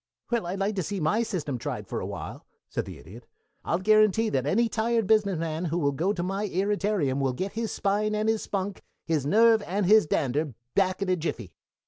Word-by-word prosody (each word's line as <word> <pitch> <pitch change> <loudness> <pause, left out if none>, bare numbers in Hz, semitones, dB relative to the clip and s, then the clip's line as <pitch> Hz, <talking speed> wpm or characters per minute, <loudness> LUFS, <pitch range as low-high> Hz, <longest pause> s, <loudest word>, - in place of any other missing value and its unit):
"Well, 235 -7 0
I'd 185 +3 -3
like 200 +2 0
to - - +1
see 200 +3 -3
my 165 +8 +1
system 155 - -3
tried - - -4
for - - -4
a - - -4
while," - - -7 0.2
said - - -3
the - - -9
Idiot. 115 +8 -13 0.4
"I'll 170 - 0
guarantee 215 +2 +4
that 135 -4 -1
any 230 +9 +3
tired 230 0 0
business 200 -3 +3
man 160 +1 -2
who 165 +1 -1
will 145 -4 +2
go 165 +8 0
to 175 -4 -2
my 195 +3 -2
irritarium 195 -7 0
will 135 -2 +1
get 190 +10 -3
his 225 0 -2
spine 210 +2 0
and 215 +1 0
his 220 -1 +1
spunk, 195 0 -3 0.2
his 155 -4 0
nerve 225 +4 +5
and 195 +3 0
his 210 -2 +6
dander, 145 -1 0 0.2
back 190 0 +1
in 190 - -3
a 185 - +3
jiffy. 120 - -4
195 Hz, 215 wpm, -27 LUFS, 155-215 Hz, 0.4 s, his